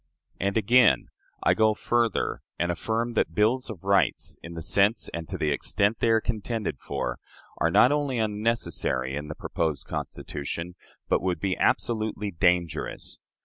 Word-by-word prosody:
And 100 +3 0
again: 120 +2 +4 0.3
"I - - +5
go 110 -1 +3
further, 120 -1 0 0.2
and 85 0 0
affirm 115 +6 -2
that 80 -7 0
bills 120 +6 +2
of 95 -6 -8
rights, 95 -7 +2
in 85 0 -9
the 80 - -5
sense 100 +3 +2
and 85 -1 -5
to 95 - -4
the 75 -3 0
extent 100 +8 +1
they 115 - +2
are 115 0 +5
contended 110 - -3
for, - - -3 0.4
are - - +3
not - - +6
only 145 -3 0
unnecessary 105 - 0
in 75 +1 -4
the 75 - -6
proposed 80 -4 -2
Constitution, 85 +5 -5 0.3
but - - +2
would 90 -1 -1
be 95 -2 0
absolutely 110 -3 0
dangerous. 85 -1 0
100 Hz, 155 wpm, -26 LUFS, 85-115 Hz, 0.4 s, not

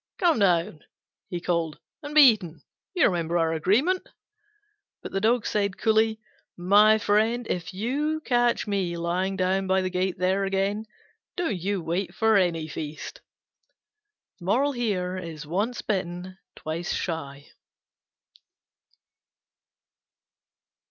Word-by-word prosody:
"Come 335 -8 +2
down," 175 -5 +2 0.5
he 175 - -3
called, 170 -3 -1 0.2
"and 295 0 -7
be 305 - +9
eaten: 205 - +3 0.3
you 355 - +4
remember 170 -3 0
our 165 -1 +1
agreement?" 235 - +1 0.9
But - - -7
the 195 - -2
Dog 230 +1 +2
said 200 -2 -1
coolly, 220 0 +2 0.4
"My 205 +5 +5
friend, 220 +3 +1
if 180 -1 -3
ever 185 - -9
you 290 +8 -1
catch 240 -4 +1
me 190 -5 -1
lying 180 +3 -1
down 190 0 0
by 190 0 +2
the 185 - -2
gate 185 0 -1
there 185 +2 +1
again, 195 +2 -1 0.5
don't 345 - -1
you 190 +1 -2
wait 175 +2 -2
for 220 -1 +3
any 170 -5 +1
feast." 155 - -7 1.2
Once 185 - -1
bitten, 185 -1 -3 0.2
twice 165 +3 -4
shy. 140 -5 -4
190 Hz, 115 wpm, -26 LUFS, 175-220 Hz, 1.2 s, be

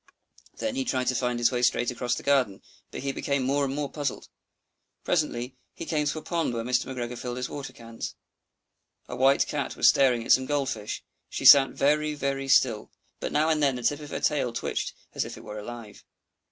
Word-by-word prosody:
Then 275 - -2
he 270 0 -1
tried 130 - -1
to - - +1
find 125 0 -1
his 120 +1 +3
way 125 -1 -1
straight 120 0 +2
across 125 0 -1
the - - -7
garden, 130 -9 +1 0.3
but - - -7
he 135 +1 -1
became 140 0 -1
more 140 +2 +1
and 135 0 -2
more 145 -1 -2
puzzled. 145 -1 -4 0.7
Presently, 130 -6 -1 0.2
he 165 - -6
came 150 -2 0
to 145 - -1
a 155 - -6
pond 165 -8 -1
where 115 - -2
Mr. 125 +1 0
McGregor 125 -2 -4
filled 120 0 -5
his 125 0 -3
water 140 -2 -6
cans. 115 -1 -8 0.9
A - - -6
white 135 +2 +4
Cat 145 -2 -3
was - - +6
staring 125 -4 +3
at - - 0
some 130 0 +5
Gold 145 -2 0
fish; 105 -1 -5 0.3
she - - -5
sat 135 -1 +9
very, 150 +2 +1
very 135 -1 -2
still, 125 -5 +3 0.3
but - - -4
now 155 +2 +2
and 155 -1 +1
then 140 -3 +3
the 125 - -6
tip 145 +5 +1
of 150 -1 -9
her - - -4
tail 140 -5 +1
twitched 115 - -3 0.2
as - - -1
if - - -8
it - - -12
were 105 0 -7
alive. 115 -1 -9
135 Hz, 220 wpm, -27 LUFS, 120-145 Hz, 0.9 s, sat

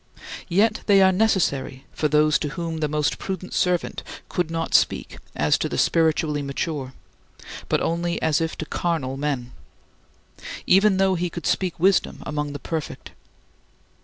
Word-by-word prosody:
Yet 215 +5 +2
they 200 -2 +6
are 190 - +6
necessary 180 -10 0
for 155 - 0
those 150 +1 +3
to 150 - -2
whom 165 +2 -4
thy 155 - 0
most 150 0 -1
prudent 185 -1 -5
servant 180 -2 0 0.3
could 175 -2 -1
not 165 0 -3
speak - - +1 0.2
as - - +2
to - - -1
the - - -3
spiritually 160 -2 +2
mature, 140 -1 -4 0.8
but - - +1
only 170 +1 -1
as 160 0 +1
if 165 0 -2
to 155 - -4
carnal 155 -6 -2
men 135 -4 -3 1.1
even 195 +1 +4
though 190 0 +3
he 180 0 -1
could 170 0 -7
speak 185 -4 0
wisdom 190 +2 +2
among 150 -1 -3
the - - -4
perfect. 160 +2 -5
165 Hz, 155 wpm, -23 LUFS, 150-180 Hz, 1.1 s, they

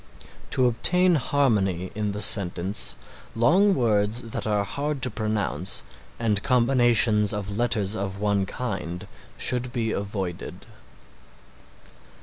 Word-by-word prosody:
To 130 - +1
obtain 180 +10 +3
harmony 105 - 0
in 105 -1 -2
the 105 0 -2
sentence 95 -1 +2 0.4
long 185 - +4
words 110 -1 +1
that 115 -1 -5
are 105 -1 +1
hard 140 +5 -4
to 125 - +2
pronounce 100 -9 -2 0.3
and 105 -3 0
combinations 120 -4 +3
of 100 0 -4
letters 110 -3 -1
of 100 -1 -4
one 100 -2 0
kind 90 -7 -5 0.3
should 125 0 -1
be 115 -3 -2
avoided. 100 -4 -5
110 Hz, 115 wpm, -25 LUFS, 100-125 Hz, 0.4 s, long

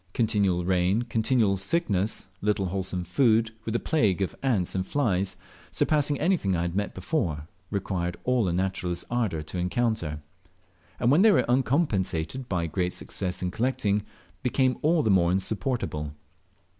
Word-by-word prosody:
Continual 100 -6 +1
rain, 95 +4 +2
continual 115 -3 +1
sickness, 105 - 0 0.2
little 105 -1 +1
wholesome 95 -1 -3
food, 110 +4 +2
with 115 - -2
a - - +2
plague 110 - +1
of 95 - -4
ants 110 -10 0
and 95 - 0
files, 100 -5 0 0.3
surpassing 145 -2 +1
anything 165 - +1
I 85 - 0
had 85 -1 -2 0.2
before 120 - 0
met 75 - -4
with, 75 +1 -10 0.3
required 90 -2 -3
all 125 -5 +2
a - - +1
naturalist's 90 -1 -1
ardour 110 -10 0
to 90 +4 -5
encounter; 90 -4 -1 0.8
and 120 - +3
when 155 +6 +5
they 220 +1 +7
were - - +3
uncompensated 120 - 0
by 85 -3 0
great 90 +2 -1
success 90 -1 -3
in 90 - -1
collecting, 110 -3 0 0.4
became 130 0 +1
all 160 0 +3
the 110 - +3
more 85 -3 +4
insupportable. 95 - -2
100 Hz, 155 wpm, -27 LUFS, 90-125 Hz, 0.8 s, they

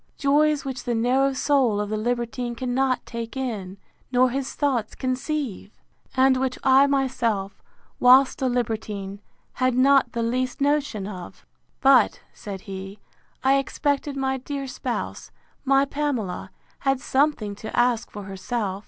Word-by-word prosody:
joys 295 +1 +2
which 260 -2 -5
the 240 - 0
narrow 255 +4 +2
soul 265 -5 +2
of 210 -1 -2
the - - 0
libertine 240 +2 -2
cannot 255 +1 0
take 230 +1 -6
in, 205 -8 -4 0.3
nor 250 0 +4
his 270 +1 -3
thoughts 260 -7 0
conceive! 255 - -3 0.4
And 260 0 +5
which 260 -1 -1
I 270 +1 +6
myself, 245 -8 -1 0.4
whilst 260 +2 +6
a 260 - +2
libertine, 215 -5 -3 0.3
had 255 -1 +1
not 275 +1 +4
the 235 -1 -1
least 255 +2 -1
notion 285 -8 0
of! 185 -3 -9 0.4
But, 265 -4 +5
said 195 -2 -7
he, 195 +1 -8 0.5
I 270 +1 +4
expected 285 0 -1
my 265 0 0
dear 275 +1 -5
spouse, 260 - -4 0.3
my 275 0 +4
Pamela, 275 -10 -3 0.3
had 270 -1 +1
something 260 -5 +1
to 220 - -7
ask 240 -2 +2
for 205 - -8
herself. 195 +1 -3
255 Hz, 140 wpm, -24 LUFS, 220-270 Hz, 0.5 s, I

